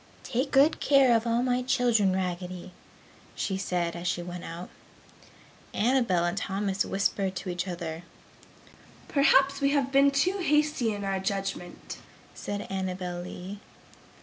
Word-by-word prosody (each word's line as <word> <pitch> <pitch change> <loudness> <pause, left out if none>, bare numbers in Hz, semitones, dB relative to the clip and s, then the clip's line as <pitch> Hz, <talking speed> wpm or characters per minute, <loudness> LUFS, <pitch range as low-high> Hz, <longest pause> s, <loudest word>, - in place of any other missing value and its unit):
"Take 260 +4 -1
good 280 +4 +4
care 270 -4 +5
of 225 +1 0
all 235 +1 +1
my 250 0 +1
children, 240 -5 +2
Raggedy!" 180 -1 -4 0.6
she 195 - -2
said 180 -3 -2
as 170 +1 -4
she 175 - -1
went 175 0 -7
out. 170 +2 -8 1.0
Annabel 230 -7 +2
and 175 +1 -1
Thomas 195 0 -1
whispered 195 -1 -1
together, 175 -3 -4 1.1
"Perhaps 275 0 +3
we 275 - +3
have 275 -2 +1
been 275 +1 +5
too 360 +8 +1
hasty 300 -7 +2
in 205 -1 -4
our 195 -1 -1
judgment!" 195 -2 -4 0.4
said 205 0 -5
Annabel 185 -2 -3
Lee. 185 +3 -8
195 Hz, 130 wpm, -28 LUFS, 180-260 Hz, 1.1 s, care